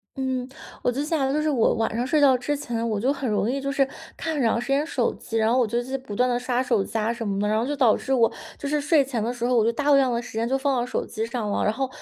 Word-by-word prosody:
嗯， 260 -1 -2 0.3
我 245 - +1
就 270 +4 -2
想 300 -3 0
的 - - 0
就 295 - +1
是 - - 0
我 255 -6 +2
晚 225 -1 -1
上 240 +2 0
睡 300 +2 +2
觉 275 -3 +6
之 255 +4 -1
前 235 -5 -3
我 215 -2 -1
就 260 +6 +1
很 275 -3 -3
容 210 +1 +1
易 275 +1 -2
就 275 0 -2
是 275 -1 +2 0.3
看 320 - -3
很 295 - -1
长 230 -1 +2
时 245 - -5
间 280 +2 +2
手 260 -6 0
机， 225 - -5
然 220 +1 +2
后 255 - +3
我 240 - +2
就 235 +3 -2 0.2
不 235 -6 -8
断 250 +4 +2
地 245 -1 0
刷 250 0 0
手 235 -6 +1
机 225 - -4
啊 220 +2 0
什 230 -2 -5
么 195 -1 -1
的， 210 - 0
然 215 +1 +1
后 235 - 0
就 290 - -1
导 250 -6 +4
致 - - -5
我 235 -4 +4 0.3
就 285 - -5
是 295 +1 0
睡 295 -1 +3
前 245 -5 -2
的 235 - -1
时 240 -1 -4
候 250 +1 +2
我 230 - +4
就 230 - +2
大 290 +4 +2
量 270 -2 +4
的 235 - 0
时 240 - -8
间 225 +2 -1
就 270 - +2
放 275 0 0
到 240 - +1
手 250 - -3
机 220 -1 -4
上 230 -3 -3
了。 - - 0
然 210 - +2
后 265 +4 -2
250 Hz, 355 characters per minute, -24 LUFS, 230-275 Hz, 0.3 s, 觉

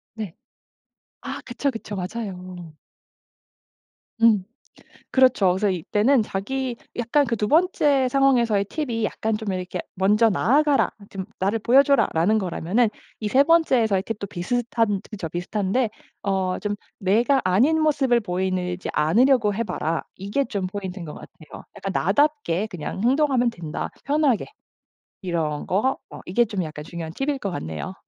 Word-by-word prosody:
네. 210 -7 -6 0.9
아 - - -6
그쵸, 265 +3 -1
그쵸. 225 -4 -7
맞아요. 185 -4 -6 1.5
음. 220 -5 +5 0.7
그렇죠. 255 -7 +4
그래서 200 +3 +1
이때는 210 - +2
자기 245 +6 -3 0.2
약간 245 +5 +2
그 235 -1 -1
2 210 0 -1
번째 295 -5 +3
상황에서의 245 -6 +3
팁이 230 -2 -3
약간 220 -1 -1
좀 215 -3 -3
이렇게 185 0 -4 0.2
"먼저 210 +4 +3
나아가라. 285 - +3 0.2
좀 190 -1 -5 0.2
나를 200 +4 +1
보여줘라."라는 230 - +3
거라면은 195 +4 +1 0.3
이 215 - -1
3 260 +6 +5
번째에서의 255 - +3
팁도 210 -3 -4
비슷한 220 +2 -1
저 215 - -6
저 165 - -4
비슷한데 200 +7 -1 0.3
어 190 -2 0
좀 205 -1 -2 0.2
"내가 235 +7 +3
아닌 250 +13 +3
모습을 275 -6 +3
보이느 185 -2 -2
지 - - -6
않으려고 215 - +3
해 230 - -1
봐라." 165 -4 -2
이게 200 +9 -1
좀 200 -6 -3
포인트인 190 -2 -6
것 150 - -7
같아요. 155 - -12
약간 195 -1 -4
"나답게 220 - +1
그냥 180 +2 -5
행동하면 260 -1 +3
된다 165 -7 -5
편하게." 285 -5 +2 0.8
이런 165 -5 -2
거 235 +9 +1
어 - - -10
이게 235 +7 +2
좀 205 -4 -3
약간 155 -1 -7
중요한 165 0 -7
팁일 275 - -1
것 200 -5 -3
같네요. 80 - -5
210 Hz, 300 characters per minute, -23 LUFS, 185-255 Hz, 1.5 s, 음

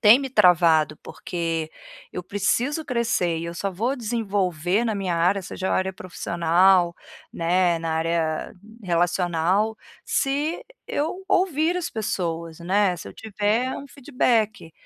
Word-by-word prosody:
tem 220 +3 +8
me 275 -1 -4
travado, 170 - +4
porque 165 -3 -4 0.4
eu 180 - -4
preciso 240 - 0
crescer 230 - 0
e 165 - -5
eu 170 - -6
só 195 +3 -2
vou 230 +9 -1
desenvolver 200 - 0
na 225 -2 0
minha 190 -4 -1
área 180 +4 +2
seja 190 +1 -4
a - - +2
área 190 0 0
profissional, 175 0 +2 0.4
né, 175 0 +2
na 165 -1 -3
área 160 -1 -1 0.3
relacional, 175 +4 +1 0.3
se 290 +4 -1 0.2
eu 340 +6 -3
ouvir 360 -3 +2
as 355 - -2
pessoas 170 -7 -3
né, 185 +1 +2
se - - -8
eu - - -10
tiver 220 +4 -1
um 280 - -8
feedback, 235 - 0
190 Hz, 135 wpm, -24 LUFS, 170-230 Hz, 0.4 s, tem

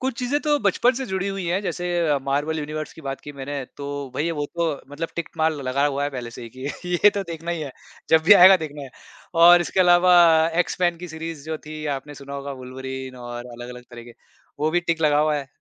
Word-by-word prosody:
कुछ 260 -2 -3
चीज़ें 255 +3 0
तो 295 -1 +1
बचपन 240 +2 +2
से 265 +2 -3
जुड़ी 190 -1 -2
हुई 195 -1 -4
हैं 175 +3 0
जैसे 180 -1 -3 0.4
मार्वल 145 +4 -1
यूनिवर्स 155 +1 -5
की - - -13
बात 135 -1 -5
की 145 - -9
मैंने 140 0 -5
तो 140 - -6 0.3
भई 155 +5 -1
वो 145 - -1
तो 170 0 +1 0.2
मतलब 160 +3 -4
टिक 170 -1 -3
मार्क 160 0 +1
लगा 135 +1 0
हुआ 140 0 -1
है 145 - -2
पहले 125 -3 -6
से 120 - -10
ही 115 - -8
कि 145 +7 -4
ये 210 - +9
तो 200 - -1
देखना 165 +1 -5
ही 170 -2 -2
है 145 -3 -6 0.4
जब 160 0 +5
भी 180 - +8
आएगा 190 -1 +9
देखना 150 -4 -7
है 135 - -9 0.5
और 175 0 +9
इसके 175 +2 0
अलावा 180 0 +5 0.5
एक्स-मैन 175 -1 -1
की 180 +1 -8
सीरीज़ 160 -2 -7
जो 160 -1 -3
थी 155 0 -7
आपने 145 +2 -10
सुना 140 0 -9
होगा 140 0 -5
वुल्वरीन 130 0 -7
और 120 0 -7
अलग-अलग 125 0 -9
तरीके 120 0 -11 0.5
वो 155 +1 +1
भी 175 +2 +2
टिक 165 -1 -1
लगा 150 -1 +4
हुआ 155 0 +2
है 140 - -5
155 Hz, 230 wpm, -23 LUFS, 140-175 Hz, 0.5 s, ये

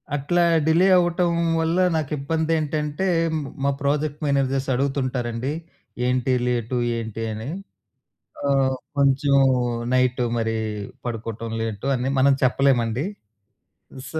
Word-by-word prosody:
అట్లా 160 +5 +1 0.3
డిలే 170 +4 +4
అవ్వటం 175 0 +2 0.3
వల్ల 165 +2 0 0.2
నాకిబ్బందేంటంటే, 155 +2 -1 0.3
మ్ - - -2 0.2
మా 140 - +3
ప్రాజెక్ట్ 145 +1 -1
మేనేజర్స్ 135 -1 0
అడుగుతుంటారండి 130 -2 -1 0.6
ఏంటి 130 0 +1
లేటు 120 0 -1 0.2
ఏంటి? 115 0 -5
అని. 110 +5 -6 1.0
ఆహ్, 135 -1 +2 0.2
కొంచెం 140 0 +3 0.6
నైటు 125 -1 +2
మరి 115 0 -1 0.5
పడుకోవటం 115 -1 -5
లేటు 110 +3 -4
అని 125 +2 -1
మనం 140 +1 +5
చెప్పలేమండి. 130 0 +2 1.1
సో 160 - -2
135 Hz, 100 wpm, -23 LUFS, 125-150 Hz, 1.1 s, మనం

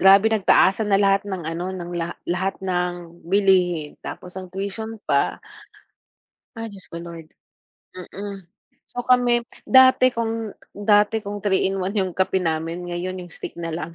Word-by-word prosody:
grabe 195 +3 +7
nagtaasan 210 -1 +3
na 195 - +5
lahat 195 0 +3
ng 190 -3 -4
ano 170 +3 -4
ng 175 -2 -6
la 170 0 -2 0.2
lahat 185 +2 -1
ng 175 -2 -3
bilihin, 180 -4 +2
tapos 180 0 -8
ang 185 -2 -8
tuition 205 +3 -5
pa. 140 -2 +1 1.2
Ah, 225 0 -5
Diyos 195 -2 -10
ko - - -8
Lord, 165 -2 -9 0.7
mm. 195 +2 -7 0.5
So 245 - -3
kami, 245 -1 +4 0.2
dati 260 -1 +6
kung 225 -2 -3 0.2
dati 210 +1 +3
kung 205 0 -5
3 200 -2 +2
in 195 0 -2
1 190 +3 -2
'yung 190 -2 0
kape 190 +1 0
namin 165 +1 -2
ngayon 185 +2 -4
'yung 175 - -14
stick - - -8
na 165 -1 -4
lang, 165 0 -5
190 Hz, 160 wpm, -23 LUFS, 175-205 Hz, 1.2 s, grabe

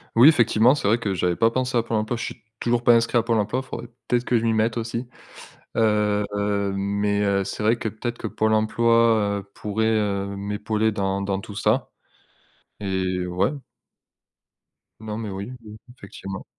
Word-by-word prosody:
Oui 120 +5 +8
effectivement, 120 -2 +4
c'est 125 - -2
vrai 115 +3 +3
que 100 -4 -2
j'avais 90 -1 0
pas 115 - +3
pensé 125 +1 -2
à 120 - +4
Pôle 115 -1 -2
emploi, 110 +3 -1
je - - -4
suis - - -7 0.2
toujours 120 0 0
pas 120 - +6
inscrit 115 +1 +3
à 115 - +3
Pôle 115 -1 +1
emploi. 110 +6 -1
Faudrait 125 -2 -7 0.2
peut-être 120 0 +1
que 120 - +2
je 115 - -1
m'y 115 - +2
mette 110 +1 +1
aussi. 115 +2 -3 0.7
Heu, 105 -2 +2
heu, 100 -1 0
mais, 100 +1 0
heu, 100 -1 +2
c'est 100 +2 -5
vrai 110 +2 +3
que, 110 - -3
peut-être 120 +3 -5
que - - -4
Pôle 110 0 0
emploi, 110 -1 +3
heu, 100 - -21
pourrait, 110 +1 0
heu, 100 -2 -1
m'épauler 105 +2 -1
dans 100 -1 -1
dans 100 0 -2
tout 100 - -10
ça, 110 +3 +1 0.9
et 95 -2 -1
ouais. 90 +6 +1 1.5
Non 110 -1 -5
mais 110 -2 -4
oui, 100 +5 -6
mmh, 105 -1 -11 0.2
effectivement. 95 -1 -8
110 Hz, 190 wpm, -23 LUFS, 100-115 Hz, 1.5 s, Oui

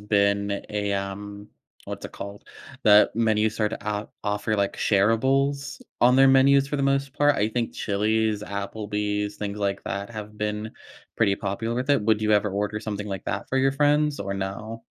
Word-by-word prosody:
been 100 -1 +1
a, 105 -1 -1
um, 100 +1 -5 0.4
what's - - -7
it - - -7
called, 100 0 -8 0.4
that 105 0 +6
menu 110 -1 +2
started, 105 0 -2
uh, 105 0 -2 0.2
offer, 105 +1 -1
like, 100 -1 0
shareables 135 - +1 0.2
on 125 +2 +5
their 135 0 +7
menus 135 +1 +5
for 145 - -2
the 140 - -1
most 140 0 +1
part. 145 0 +3
I 105 - +1
think 115 0 -2
Chili's, 110 +1 0
Applebee's, 105 0 -3
things 105 0 -4
like 100 -1 -1
that 100 +2 -4
have 105 -1 -8
been 105 +1 -3 0.5
pretty 100 -3 +3
popular 110 +4 -3
with 125 +2 -3
it. 140 -7 +3
Would 110 0 +2
you 110 - +2
ever 105 0 +3
order 105 +2 -2
something 105 -2 -4
like 95 -2 -5
that 100 -1 -3
for 135 - -1
your 135 +1 +3
friends 150 0 +2
or 100 0 -3
no? 105 +4 -5
105 Hz, 180 wpm, -25 LUFS, 100-120 Hz, 0.5 s, their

